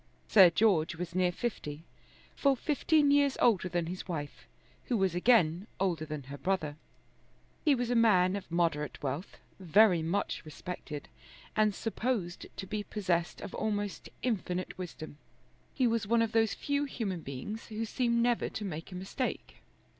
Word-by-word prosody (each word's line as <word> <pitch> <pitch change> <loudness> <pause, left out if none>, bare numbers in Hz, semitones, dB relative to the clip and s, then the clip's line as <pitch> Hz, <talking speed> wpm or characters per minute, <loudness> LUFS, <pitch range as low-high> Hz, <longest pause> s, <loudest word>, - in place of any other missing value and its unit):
Sir 190 -5 +8
George 170 -4 +2
was 170 0 -5
near 180 0 +2
fifty, 165 -8 -4 0.5
full 275 -1 +3
fifteen 295 +1 +2
years 285 -1 +3
older 195 -6 +3
than 175 -1 -1
his 180 +4 -6
wife, 150 -5 -5 0.4
who 240 - 0
was 190 -3 +1
again 180 -2 +3
older 175 -5 0
than 150 -2 -5
her 140 +2 -9
brother. 180 -6 -1 0.9
He 295 -3 +5
was 245 -1 -1
a - - +2
man 195 -5 +4
of 200 - -6
moderate 165 -4 -1
wealth, 145 +7 -4 0.2
very 185 0 +5
much 170 +6 -1
respected, 155 -2 -7 0.5
and 215 -2 +3
supposed 220 -6 -2
to - - -4
be 210 +2 -3
possessed 185 -5 -1
of - - -7
almost 205 -2 -2
infinite 185 -6 -2
wisdom. 160 -4 -8 0.5
He 260 - +1
was 230 -3 +1
one 230 +1 +4
of 225 - -1
those 225 -1 +2
few 285 0 -1
human 210 -9 -3
beings 145 - -6
who 220 +1 -3
seem 235 0 +1
never 240 -1 +1
to 210 - -5
make 165 -2 -6
a - - -7
mistake. 195 +8 -4
190 Hz, 160 wpm, -31 LUFS, 170-230 Hz, 0.9 s, Sir